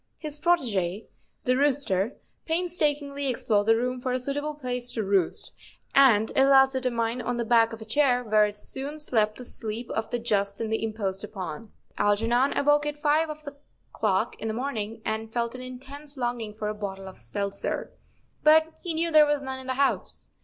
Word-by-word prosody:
His 300 -1 -5
protege, 225 - +1 0.4
the 255 - +2
rooster, 260 -7 +1 0.3
painstakingly 295 -5 0
ex¬ 245 - -6
plored 205 -2 +3
the 225 +1 +5
room 250 +2 -2
for 255 - -2
a 250 - +1
suitable 290 +4 -3
place 250 -3 -1
to 220 - -1
roost, 195 -3 +1 0.4
and 225 -6 +5
at 270 0 +5
last 270 0 +6
determined 245 -2 -1
on 240 +1 -2
the 235 - -1
back 230 -1 +4
of 225 -1 -7
a - - -13
chair, 250 +1 +2
where 215 -2 +4
it 205 0 -8
soon 275 +7 -6
slept 220 -8 +1
the 250 - -8
sleep 225 +1 -5
of 220 - -2
the 240 - -1
just 200 -4 0
and 220 -1 -2
the 220 - -1
imposed 205 -3 -3
upon. 200 0 -7 0.3
Algernon 230 +6 +2
awoke 295 +1 +3
at 295 0 -3
five 305 +2 +2
of 305 0 -7
the 285 -1 -8 0.4
clock 190 -3 0
in 225 - -2
the 220 - -2
morning 225 -4 -4
and 220 0 -3
felt 235 0 -1
an 255 - -7
intense 275 +3 -7
longing 240 -4 -3
for 215 0 -4
a 210 - -1
bottle 195 -2 -6
of 190 - -10
seltzer, 200 -1 -3 0.5
but 315 +1 +5
he 340 -3 -3
knew 335 +1 0
there 305 -1 +7
was 290 -1 0
none 265 -1 -4
in 260 - -9
the 260 - -1
house. 275 +1 -1
245 Hz, 195 wpm, -26 LUFS, 215-280 Hz, 0.5 s, there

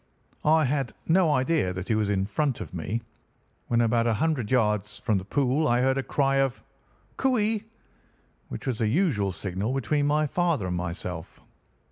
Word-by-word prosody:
I 155 0 +4
had 135 -2 -1
no 170 -1 +4
idea 130 - +1
that 95 +1 -5
he - - +1
was 110 -1 +1
in 95 -1 +1
front 140 +4 -1
of - - -7
me. 100 +7 -3 0.6
When 120 0 +2
about 115 0 +2
a 115 - +2
hundred 135 -3 0
yards 105 -4 +1
from 105 -3 0
the - - -8
pool 140 +7 +1
I 120 +1 +3
heard 130 +1 +2
a - - +1
cry 135 0 +1
of 135 -2 0 0.5
"Cooee!" 225 -4 +1 0.8
which - - -7
was 125 -4 -2
a 110 - +2
usual 110 - +1
signal 100 +6 -3
between 145 +2 +1
my 150 +1 +2
father 165 - 0
and 90 -1 -2
myself. 90 -1 -5
125 Hz, 175 wpm, -26 LUFS, 105-150 Hz, 0.8 s, I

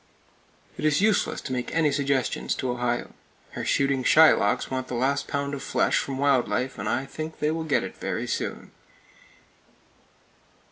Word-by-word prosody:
It - - -5
is 150 -2 +3
useless 210 +1 +1
to 130 - -5
make 125 -1 -3
any 160 -3 +3
suggestions 140 -2 0
to 130 - -2
Ohio. 120 0 -2 0.4
Her - - -5
shooting 135 -1 +1
Shylocks 155 -10 +4
want 130 0 -2
the 125 - -4
last 140 +3 0
pound 140 0 -2
of 140 - -4
flesh - - +1
from 135 -1 -4
wild 135 -2 +2
life, 130 0 -2
and - - -2
I 130 - -1
think 155 +3 -7
they 150 +1 0
will 160 0 -3
get 150 - +1
it - - -7
very - - -3
soon. - - -4
140 Hz, 170 wpm, -25 LUFS, 130-150 Hz, 0.4 s, Shylocks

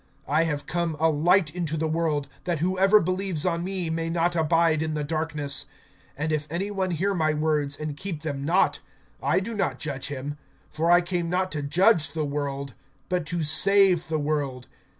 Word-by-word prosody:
(46)I 155 +4 +2
have 150 -3 -2
come 170 -2 -2
a 160 0 +4
light 165 +2 +3
into 165 -3 -2
the 160 +1 0
world, 155 -3 0 0.2
that 175 -3 0
whoever 190 +5 +4
believes 185 -3 -1
on 170 -1 0
me 185 -2 -3
may 165 0 -2
not 170 +1 +1
abide 165 -1 +2
in 155 -1 -2
the 150 - -2
darkness. 150 -2 -2 0.5
(47)And 155 +2 -1
if 150 -1 -1
any 185 +6 -3
one 190 -2 -1
hear 185 +4 0
my 155 -4 +1
words, 150 -2 0
and 155 -1 -4
keep 165 -1 -5
them 140 -3 -3
not, 170 +6 +2 0.4
I - - +2
do 215 +5 -4
not 140 -11 -1
judge 140 -3 -3
him; 145 +1 -5 0.3
for 160 +2 0
I 175 +1 +6
came 175 -1 -2
not 185 +1 0
to 150 - -3
judge 165 +4 +3
the 155 -2 -1
world, 140 -2 -3 0.4
but 180 -3 -1
to 170 0 -1
save 190 +3 +4
the 155 0 -1
world. 145 -4 -2
160 Hz, 190 wpm, -25 LUFS, 150-180 Hz, 0.5 s, I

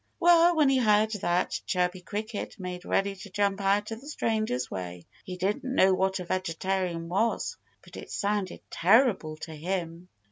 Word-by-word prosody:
Well, 345 0 +6
when 305 -3 +4
he 265 -1 +3
heard 215 -2 +3
that, 180 -4 0
Chirpy 180 0 0
Cricket 210 +3 -5
made 180 -1 -6
ready 195 0 0
to 200 - -10
jump 200 +1 0
out 205 +2 +1
of 225 +1 -6
the 280 - -13
stranger's 215 - -1
way. 90 -2 -6 0.2
He 180 -1 -6
didn't 195 +3 -1
know 190 -5 +5
what 190 +1 +1
a 180 - -5
vegetarian 185 -1 -2
was; 205 +7 0 0.3
but - - -14
it - - -9
sounded 200 -2 -2
terrible 195 - +3
to 160 0 -8
him. 170 +1 -4
190 Hz, 170 wpm, -28 LUFS, 180-215 Hz, 0.3 s, Well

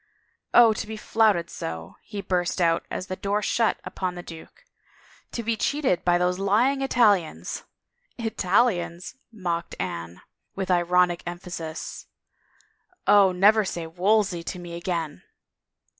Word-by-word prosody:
" - - -45
Oh, 235 -2 +8
to 215 - -5
be 220 0 -6
flouted 210 -6 +2
so! 80 +1 -6
" - - -41
he 205 -2 -7
btwst 180 -1 -1
out 165 -1 +2
as 185 - -4
the 185 - -4
door 200 +2 -1
shut 225 +2 +1
upon 185 -1 -4
the 175 - -7
duke. 175 - -12 0.3
" - - -28
To 235 - -3
be 230 0 0
cheated 260 - 0
by 175 0 +3
those 180 +1 0
lying 235 +8 +2
Italians 210 -10 +1 0.2
— 485 - -52
" - - -42
"Italians?" 190 -5 0 0.2
mocked 175 -6 -3
Anne, 85 +1 -5 0.3
with 190 -1 -2
ironic 175 0 +3
emphasis. 175 -2 -6 0.5
" - - -35 0.3
Oh, 200 -2 +6
never 210 +4 +5
say 175 -3 -4
Wolsey 185 +2 +1
to 180 - -5
me 175 -1 -8
again 170 - -3
185 Hz, 155 wpm, -25 LUFS, 175-215 Hz, 0.5 s, Oh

